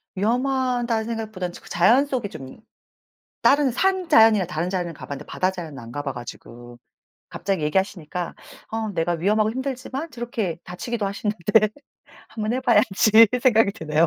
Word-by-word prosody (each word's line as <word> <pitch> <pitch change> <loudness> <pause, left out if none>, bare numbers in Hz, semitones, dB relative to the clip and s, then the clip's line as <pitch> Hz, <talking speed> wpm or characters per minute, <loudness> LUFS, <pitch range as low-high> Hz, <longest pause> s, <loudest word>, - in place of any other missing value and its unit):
위험하다는 245 +1 0
생각보다는 220 -6 -4
저 - - -12
그 - - -15
자연 225 +11 +4
속에 255 -7 -3
좀 130 -6 -10 0.8
다른 280 -2 +4
산 375 +6 0
자연이나 220 -4 +6
다른 175 0 -3
자연은 180 -3 -2
가 - - -10
봤는데 140 +1 -7
바다 185 +1 -1
자연은 165 -6 -8
안 115 -1 -10
가 145 - -4
봐 140 - -3
가지고. 120 0 -10 0.5
갑자기 190 -6 -2
얘기하시니까 180 0 -2 0.4
'어 220 -1 -2
내가 165 +1 0
위험하고 210 +6 +1
힘들지만 260 +4 -4
저렇게 230 -8 -3
다치기도 215 +5 -4
하시는데 210 +1 +1 0.6
1 220 - -7
번 215 - 0
해 255 - -1
봐야지.' 225 -2 +5
생각이 225 -5 +4
드네요. 160 -5 +1
210 Hz, 365 characters per minute, -23 LUFS, 175-235 Hz, 0.8 s, 자연이나